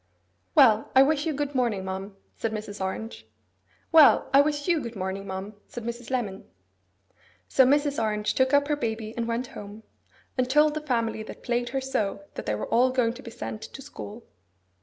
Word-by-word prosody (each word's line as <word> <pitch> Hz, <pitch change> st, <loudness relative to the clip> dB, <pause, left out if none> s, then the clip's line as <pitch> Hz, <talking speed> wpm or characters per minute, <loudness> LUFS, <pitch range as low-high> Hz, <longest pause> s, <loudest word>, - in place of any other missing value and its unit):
'Well, 220 Hz, 0 st, +6 dB
I 265 Hz, -, +9 dB
wish 300 Hz, +2 st, +1 dB
you 315 Hz, -, 0 dB
good 290 Hz, 0 st, -2 dB
morning, 235 Hz, -7 st, 0 dB
ma'am,' 190 Hz, +1 st, -5 dB, 0.2 s
said 225 Hz, -, -2 dB
Mrs. 210 Hz, -2 st, -5 dB
Orange. 190 Hz, -, -5 dB, 0.6 s
'Well, 320 Hz, -2 st, +6 dB
I 275 Hz, -, +8 dB
wish 290 Hz, 0 st, -1 dB
you 340 Hz, -3 st, +3 dB
good 235 Hz, -4 st, -6 dB
morning, 195 Hz, +1 st, -4 dB
ma'am,' 190 Hz, +2 st, -5 dB
said 240 Hz, -, -8 dB
Mrs. 235 Hz, +1 st, -6 dB
Lemon. 220 Hz, -6 st, -2 dB, 1.0 s
So 265 Hz, -, +5 dB
Mrs. 285 Hz, -2 st, +2 dB
Orange 210 Hz, -1 st, 0 dB
took 260 Hz, 0 st, +2 dB
up 285 Hz, 0 st, +4 dB
her 295 Hz, -, +1 dB
baby 220 Hz, -5 st, -3 dB
and 235 Hz, -1 st, -2 dB
went 235 Hz, +2 st, -1 dB
home, 205 Hz, +2 st, -9 dB, 0.6 s
and 250 Hz, 0 st, +1 dB
told 300 Hz, +2 st, +4 dB
the 310 Hz, -, -3 dB
family 230 Hz, -6 st, -1 dB
that 215 Hz, -, -10 dB
plagued 240 Hz, 0 st, -1 dB
her 270 Hz, 0 st, -2 dB
so 210 Hz, -7 st, -2 dB
that -, -, -7 dB
they 105 Hz, -, +1 dB
were 105 Hz, -, -3 dB
all 250 Hz, +2 st, +3 dB
going 250 Hz, -3 st, +1 dB
to 250 Hz, -, -11 dB
be 250 Hz, -, -9 dB
sent 215 Hz, -1 st, -6 dB
to 270 Hz, -, -9 dB
school. 230 Hz, -4 st, -9 dB
235 Hz, 195 wpm, -26 LUFS, 210-270 Hz, 1.0 s, I